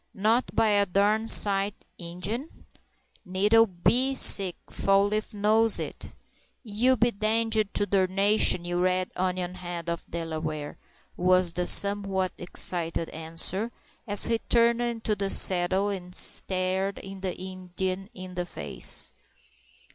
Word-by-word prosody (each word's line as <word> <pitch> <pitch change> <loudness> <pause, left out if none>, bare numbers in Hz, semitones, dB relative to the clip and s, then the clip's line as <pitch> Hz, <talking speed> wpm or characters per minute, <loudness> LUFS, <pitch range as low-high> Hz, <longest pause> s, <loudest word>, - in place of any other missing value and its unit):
"Not 220 +5 0
by 220 - +2
a 205 -1 +1
darn 205 +4 0
sight, 200 -2 +5 0.2
Ingen?" 185 - -6 0.6
"Nettle 210 +5 +2
be 245 +9 0
sick—Fall 195 -1 +3
leaf 215 +1 -3
knows 220 +1 +3
it!" - - -7 0.5
"You 245 +4 0
be 240 +1 +1
danged 220 0 0
to 205 - 0
darnation, 195 -1 +2
you 175 0 -3
red 185 0 -1
onion 180 -1 -3
head 175 -2 -6
of 170 - -5
a - - -30
Delaware!" 155 -3 -6 0.4
was 180 -1 +2
the 180 +1 -2
somewhat 195 -2 +3
excited 170 -2 0
answer, 165 +7 -3 0.4
as 205 -1 +4
he 230 -1 0
turned 235 0 +1
in 235 -2 -4
the 200 -2 -1
saddle 190 +2 +3
and 180 -2 -7
stared 190 +1 0
the 195 -1 -7
Indian 185 +1 -5
in 185 -1 -10
the 180 -1 -5
face. - - -1
195 Hz, 125 wpm, -26 LUFS, 180-215 Hz, 0.6 s, sight